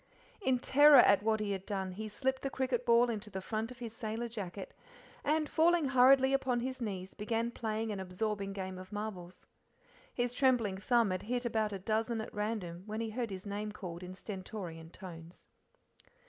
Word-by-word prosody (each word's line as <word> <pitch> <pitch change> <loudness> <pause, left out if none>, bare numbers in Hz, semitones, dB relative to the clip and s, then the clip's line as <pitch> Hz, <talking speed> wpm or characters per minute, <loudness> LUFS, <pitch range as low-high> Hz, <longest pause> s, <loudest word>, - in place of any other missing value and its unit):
In 260 -9 +2
terror 290 +3 +7
at 200 - +7
what 220 0 +1
he 210 -1 -1
had 190 -1 -3
done, 195 -2 -3
he 215 +4 -5
slipped 265 +5 -1
the 275 - -2
cricket 255 -2 -1
ball 235 +1 +6
into 215 -3 -4
the 190 -2 -4
front 220 +3 -3
of 250 - -10
his 235 -2 -7
sailor 225 +1 -3
jacket, 200 -4 -6 0.5
and, 305 +1 +1
falling 330 -1 +3
hurriedly 265 +1 +6
upon 255 -3 +1
his 260 +1 -4
knees, 190 -4 -4
began 230 +2 -1
playing 220 -1 -2
an 200 - -3
absorbing 195 +2 -2
game 190 -1 -5
of 185 0 -11
marbles. 205 -4 -6 0.7
His 245 0 -1
trembling 245 -7 +2
thumb 230 +1 +2
had 185 - -2
hit 245 +3 -2
about 220 -2 0
a 200 - -3
dozen 220 +3 -1
at 220 - -6
random 210 -5 -3
when 215 +1 -3
he 225 -1 -2
heard 235 0 -2
his 190 0 -7
name 205 +1 -3
called 180 -4 -7
in 180 0 -8
stentorian 185 -5 -7
tones. 170 -2 -11
215 Hz, 190 wpm, -33 LUFS, 195-245 Hz, 0.7 s, terror